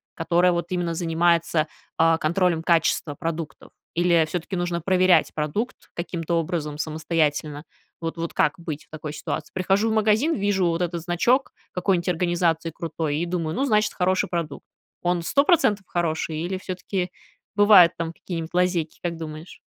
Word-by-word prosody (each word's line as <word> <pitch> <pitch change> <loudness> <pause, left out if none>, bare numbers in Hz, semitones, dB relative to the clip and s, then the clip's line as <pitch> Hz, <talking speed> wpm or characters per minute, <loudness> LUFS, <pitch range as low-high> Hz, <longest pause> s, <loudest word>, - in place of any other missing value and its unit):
которая 175 +2 +2
вот 170 0 -2
именно 175 -2 -1
занимается, 165 -1 +1 0.3
а, 165 0 +4
контролем 170 +1 +1
качества 165 -3 +2
продуктов. 165 -3 -5 0.2
Или 170 -1 +4
всё-таки 180 +3 -4
нужно 175 -1 -2
проверять 185 -2 +3
продукт 155 - -2 0.2
каким-то 170 -1 -3
образом 160 -3 -2
самостоятельно? 155 -1 -1 0.4
Вот 165 0 -4
вот 170 0 -4
как 150 - +3
быть 155 -3 -6
в - - -40
такой 155 -1 -6
ситуации? 150 - -5
Прихожу 195 +4 +1
в 220 - 0
магазин, 220 +9 +2
вижу 195 -3 +1
вот 165 +1 0
этот 170 -1 -3
значок 205 - +1 0.2
какой-нить 180 -1 0
организации 170 -2 +1
крутой, 160 -3 -3
и 170 - -1
думаю: 170 -2 -2
"Ну, 275 - +1
значит, 215 -4 +2
хороший 185 0 +1
продукт". 165 -4 -4 0.4
Он 175 -1 0
100 280 +10 +3
процентов 210 - +3
хороший, 160 -2 -1
или 180 +3 -2
всё-таки 185 0 -3 0.5
бывают 205 -5 +7
там 165 0 -3
какие-нибудь 165 -2 -6
лазейки, 180 -3 0
как 170 -2 -3
думаешь? 155 +1 -8
170 Hz, 155 wpm, -24 LUFS, 160-185 Hz, 0.5 s, бывают